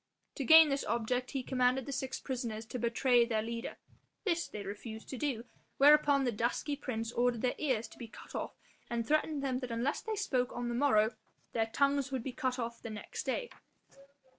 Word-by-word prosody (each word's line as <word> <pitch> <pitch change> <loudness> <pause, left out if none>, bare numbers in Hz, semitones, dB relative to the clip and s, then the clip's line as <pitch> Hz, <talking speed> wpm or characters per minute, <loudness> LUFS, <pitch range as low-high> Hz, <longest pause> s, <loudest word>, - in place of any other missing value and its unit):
To 275 - -4
gain 320 +2 +9
this 275 0 0
object 240 +3 -1
he 270 -2 -3
commanded 255 0 +1
the - - -5
six 265 -1 -3
prisoners 235 -4 -4
to 245 +3 -5
betray 240 +1 +3
their 225 -2 0
leader; 230 +1 -5 0.5
this 345 -4 0
they 205 - -7
refused 220 +3 -7
to 260 - -5
do, 255 -6 -2 0.3
whereupon 285 -1 +6
the 250 - +1
dusky 240 +6 -1
prince 230 -5 -4
ordered 240 -1 +1
their 250 - +2
ears 250 -7 0
to - - -16
be 235 - -6
cut - - -13
off - - -4 0.3
and 235 -1 -2
threatened 305 -1 +1
them 260 -2 0
that 250 -2 -5
unless 235 +5 -1
they 440 0 -3
spoke 260 -12 0
on 245 0 -3
the - - -2
morrow, 235 -4 +3 0.4
their 225 -1 +1
tongues 280 +3 +1
would 260 -3 -2
be 265 - -4
cut 255 -2 -1
off 235 -1 -4
the 230 - -6
next 215 -1 -6
day. 485 - -2
250 Hz, 200 wpm, -33 LUFS, 230-275 Hz, 0.5 s, gain